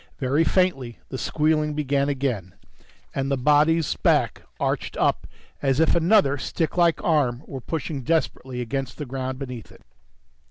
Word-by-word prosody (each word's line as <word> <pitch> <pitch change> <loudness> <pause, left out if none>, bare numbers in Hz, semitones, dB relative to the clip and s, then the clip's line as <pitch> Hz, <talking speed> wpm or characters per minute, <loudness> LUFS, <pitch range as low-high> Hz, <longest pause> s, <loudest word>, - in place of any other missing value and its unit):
Very 140 +3 +2
faintly, 155 -10 +1
the 130 - -4
squealing 150 -1 +1
began 140 -1 0
again, 125 -10 -2 0.6
and 135 0 -1
the 140 - +1
body's 150 +3 +3
back - - +2 0.2
arched - - -2
up - - +1 0.3
as 135 0 +1
if 160 - +4
another 170 -4 +4
sticklike 170 +3 +1
arm 145 -8 +1
were 135 -2 -7
pushing 150 0 -4
desperately 130 -4 -1
against 130 +1 -4
the 150 - -5
ground 130 0 -4
beneath 125 -4 -7
it. - - -18
140 Hz, 145 wpm, -24 LUFS, 130-160 Hz, 0.6 s, if